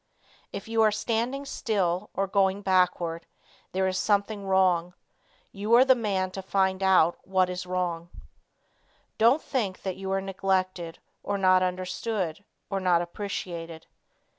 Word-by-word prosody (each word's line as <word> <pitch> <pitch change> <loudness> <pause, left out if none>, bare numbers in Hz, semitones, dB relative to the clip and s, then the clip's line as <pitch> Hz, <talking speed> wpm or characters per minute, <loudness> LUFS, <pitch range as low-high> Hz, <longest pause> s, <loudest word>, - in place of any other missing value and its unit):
If 200 - -7
you 225 0 +1
are 220 - +6
standing 235 +6 -2
still, 200 -7 -1
or 195 - +1
going 195 0 +1
backward, 180 -3 +1 0.4
there 190 0 0
is 185 0 -1
something 200 -1 0
wrong. 180 -2 +2 0.6
You 210 +3 +1
are 250 +2 +7
the 265 - +7
man 195 -6 -1
to 195 - -6
find 190 0 0
out 185 -3 +4
what 185 -1 +1
is 180 0 -5
wrong. 175 -2 -2 1.1
Don't 240 +7 +4
think 215 -9 -2
that 190 -2 -3
you 190 0 -5
are 195 - +1
neglected, 185 -3 -2 0.2
or 200 - -2
not 185 -1 +4
understood, 185 0 -2 0.2
or 195 - -2
not 180 -2 +2
appreciated. 170 -3 -6
190 Hz, 140 wpm, -27 LUFS, 180-205 Hz, 1.1 s, are